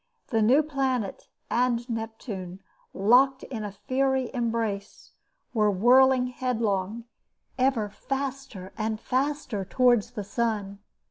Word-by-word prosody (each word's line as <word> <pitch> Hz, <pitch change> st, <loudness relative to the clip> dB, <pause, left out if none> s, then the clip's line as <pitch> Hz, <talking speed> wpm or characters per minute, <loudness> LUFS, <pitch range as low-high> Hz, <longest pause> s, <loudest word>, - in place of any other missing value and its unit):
The 225 Hz, -3 st, +1 dB
new 260 Hz, +8 st, +5 dB
planet 265 Hz, -7 st, -2 dB, 0.2 s
and 240 Hz, -1 st, +1 dB
Neptune, 220 Hz, -5 st, -6 dB, 0.3 s
locked 255 Hz, +7 st, +4 dB
in 225 Hz, -5 st, -5 dB
a 205 Hz, -, -4 dB
fiery 260 Hz, +6 st, 0 dB
embrace, 225 Hz, -5 st, -3 dB, 0.4 s
were 215 Hz, -3 st, +3 dB
whirling 250 Hz, +6 st, +5 dB
headlong, 230 Hz, -4 st, -2 dB, 0.6 s
ever 255 Hz, -5 st, +2 dB
faster 265 Hz, -3 st, -5 dB
and 215 Hz, 0 st, -1 dB
faster 260 Hz, -5 st, -1 dB
towards 240 Hz, +2 st, +2 dB
the 210 Hz, -4 st, -4 dB
sun. 205 Hz, -2 st, -2 dB
235 Hz, 110 wpm, -26 LUFS, 210-260 Hz, 0.6 s, new